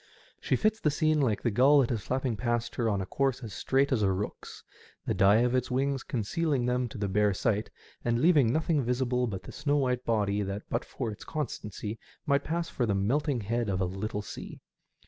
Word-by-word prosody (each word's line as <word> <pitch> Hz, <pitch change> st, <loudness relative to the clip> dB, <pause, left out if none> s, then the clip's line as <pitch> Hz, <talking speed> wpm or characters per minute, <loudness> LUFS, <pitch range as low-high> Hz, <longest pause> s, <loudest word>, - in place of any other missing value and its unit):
She -, -, +1 dB
fits 215 Hz, 0 st, +1 dB
the 150 Hz, -, +2 dB
scene 155 Hz, 0 st, +2 dB
like 115 Hz, -7 st, 0 dB
the 120 Hz, -, +1 dB
gull 140 Hz, +6 st, +6 dB
that 125 Hz, -, 0 dB
is 115 Hz, -3 st, -1 dB
flapping 130 Hz, +1 st, -1 dB
past 120 Hz, +2 st, -1 dB
her 115 Hz, -2 st, 0 dB
on 100 Hz, -2 st, 0 dB
a -, -, -3 dB
course 135 Hz, +3 st, -1 dB
as 110 Hz, -4 st, -7 dB
straight 135 Hz, +7 st, +1 dB
as 125 Hz, -5 st, +2 dB
a 95 Hz, -2 st, +3 dB
rook*s, 95 Hz, +3 st, -5 dB, 0.4 s
the -, -, 0 dB
dye 100 Hz, +4 st, +5 dB
of 125 Hz, 0 st, +2 dB
its 130 Hz, -1 st, 0 dB
wings 135 Hz, +1 st, 0 dB
concealing 135 Hz, +4 st, -1 dB
them 125 Hz, 0 st, +1 dB
to 120 Hz, -, -9 dB
the 100 Hz, -1 st, -1 dB
bare 100 Hz, 0 st, +2 dB
sight, 105 Hz, 0 st, 0 dB, 0.3 s
and 120 Hz, -1 st, +1 dB
leaving 145 Hz, -6 st, +5 dB
nothing 155 Hz, +1 st, +1 dB
visible 125 Hz, 0 st, 0 dB
but 95 Hz, -4 st, -5 dB
the -, -, -9 dB
snow 145 Hz, -1 st, 0 dB
wliite 125 Hz, -2 st, 0 dB
body 105 Hz, -3 st, +1 dB
that 100 Hz, +1 st, -4 dB
but 115 Hz, -, 0 dB
for 120 Hz, -4 st, -4 dB
its 105 Hz, -, -9 dB
constancy 110 Hz, -7 st, -5 dB, 0.3 s
might 140 Hz, -1 st, +2 dB
pass 170 Hz, +1 st, -2 dB
for 120 Hz, -, -1 dB
the 100 Hz, -, +1 dB
melting 130 Hz, +6 st, 0 dB
head 115 Hz, +2 st, -1 dB
of 95 Hz, -2 st, 0 dB
a 95 Hz, -, +1 dB
little 105 Hz, +3 st, -3 dB
sea. -, -, -8 dB
120 Hz, 220 wpm, -29 LUFS, 105-135 Hz, 0.4 s, gull